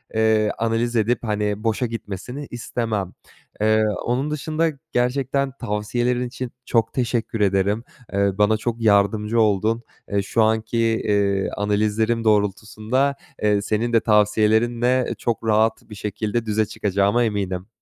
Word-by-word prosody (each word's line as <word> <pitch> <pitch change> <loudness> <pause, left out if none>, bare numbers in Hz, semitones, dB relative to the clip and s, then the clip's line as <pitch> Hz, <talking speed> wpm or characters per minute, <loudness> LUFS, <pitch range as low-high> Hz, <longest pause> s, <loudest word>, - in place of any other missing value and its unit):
eee, 110 -1 +3
analiz 115 +1 0
edip 115 +2 +2
hani 105 -1 -1
boşa 115 +2 0
gitmesini 115 +5 -6
istemem. 110 -5 -3 0.5
Eee, 110 0 +3 0.2
onun 130 +5 0
dışında 155 +2 0 0.2
gerçekten 135 +2 0
tavsiyelerin 120 +3 -1
için 125 0 -6
çok 115 -1 +1
teşekkür 115 -3 -1
ederim. 100 +3 +1 0.3
Eee, 100 0 +2
bana 105 +1 +3
çok 115 +1 -3
yardımcı 105 +1 +2
oldun. 110 +3 +1 0.3
Eee, 100 -1 +2
şu 110 +3 +1
anki, 110 +1 0
eee, 100 -4 +1
analizlerim 110 +3 +1
doğrultusunda, 110 +6 +1 0.3
eee, 105 -1 +3
senin 115 +3 -1
de 115 - +6
tavsiyelerinle 110 +4 +2
çok 115 -1 -2
rahat 110 0 +1
bir 105 - -9
şekilde 105 +3 -3
düze 110 0 +1
çıkacağıma 100 +3 +1
eminim. 95 -4 -2
110 Hz, 130 wpm, -22 LUFS, 105-120 Hz, 0.5 s, de